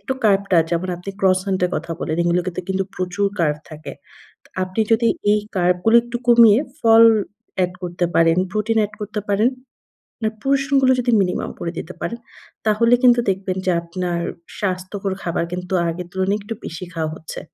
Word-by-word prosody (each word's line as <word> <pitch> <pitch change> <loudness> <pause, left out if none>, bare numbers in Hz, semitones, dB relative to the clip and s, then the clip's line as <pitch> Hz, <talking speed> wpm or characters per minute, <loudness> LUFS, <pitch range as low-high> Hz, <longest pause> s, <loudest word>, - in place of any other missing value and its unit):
একটু 265 - -3
কার্বটা, 195 -3 +3
যেমন 175 +2 -1
আপনি 180 +3 -7
ক্রসান্ট 190 0 +2
এর - - -8
কথা 165 +1 -4
বলেন, 155 - -2
এগুলোতে 175 +1 0
কিন্তু 190 0 0
প্রচুর 185 +2 -1
কার্ব 150 -3 +2
থাকে। 155 0 -8 0.7
আপনি 185 +4 -2
যদি 230 +1 +4 0.2
এই 210 - +3 0.2
কার্ব 180 0 +3
গুলি 230 +1 +6
একটু 240 0 -5
কমিয়ে 235 -2 +7 0.2
ফল 225 -1 +6 0.6
এড 180 - -1
করতে 175 0 -1
পারেন, 165 +1 +4
প্রোটিন 215 +2 0
এড 210 - -12
করতে 210 +1 -3
পারেন, 215 +5 +3 0.7
আপনার 220 -1 -2
portion 275 +1 +1
গুলো 260 0 +5
যদি 245 0 0
মিনিমাম 180 -2 -1
করে 170 - -3
দিতে - - -7
পারেন, 235 - -4 0.5
তাহলে 230 +3 +4
কিন্তু 245 -1 +6
দেখবেন 190 -1 -2
যে 180 - +3
আপনার 175 0 -3 0.4
স্বাস্থ্যকর 190 0 -3
খাবার 170 -1 -1
কিন্তু 180 +1 -5 0.2
আগের 170 +1 -5
তুলনায় 190 +2 0
একটু 210 +3 -6
বেশি 165 +2 -6
খাওয়া 160 -2 -2
হচ্ছে। 160 - -8
190 Hz, 170 wpm, -20 LUFS, 175-220 Hz, 0.7 s, কমিয়ে